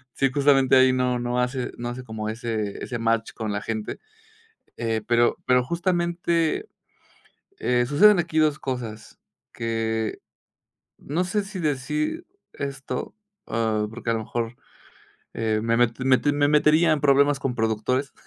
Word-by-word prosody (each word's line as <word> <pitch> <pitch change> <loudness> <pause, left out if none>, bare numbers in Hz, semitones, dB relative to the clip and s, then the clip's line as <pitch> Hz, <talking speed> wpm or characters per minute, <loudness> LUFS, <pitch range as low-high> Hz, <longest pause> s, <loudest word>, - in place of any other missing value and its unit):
Sí, 135 -1 +1
justamente 140 -2 +4
ahí 130 0 +5
no 125 -1 +1
no 120 +1 -1
hace 125 0 -2
no 120 0 -4
hace 125 +1 -6
como 110 -2 -5
ese 110 -2 -3
ese 120 - -4
match 115 0 0
con 110 -2 -4
la 105 - -2
gente, 110 -2 -4 0.8
eh, 115 -2 -1
pero, 120 0 +3
pero 125 0 +4
justamente, 170 - 0 0.9
eh, 125 0 +1
suceden 195 +8 +6
aquí 160 -1 -2
2 155 -1 +3
cosas, 120 -6 -6 0.3
que, 115 -1 -2 0.8
no 165 +6 -2
sé 205 +2 -1
si 195 -2 -7
decir 305 - -2 0.3
esto, 135 - -5 0.3
ah, 110 -1 0
porque 115 +1 -6
a - - +2
lo 115 - -1
mejor, 115 +1 -4 0.8
eh, 110 -1 0
me 115 0 +1
mete 120 +1 +1
me 130 -1 +5
te 145 - +1
me 145 0 +2
metería 155 +2 +4
en 155 - +2
problemas 140 0 +4
con 125 -3 -2
productores, 115 +5 -1
125 Hz, 150 wpm, -24 LUFS, 115-150 Hz, 0.9 s, suceden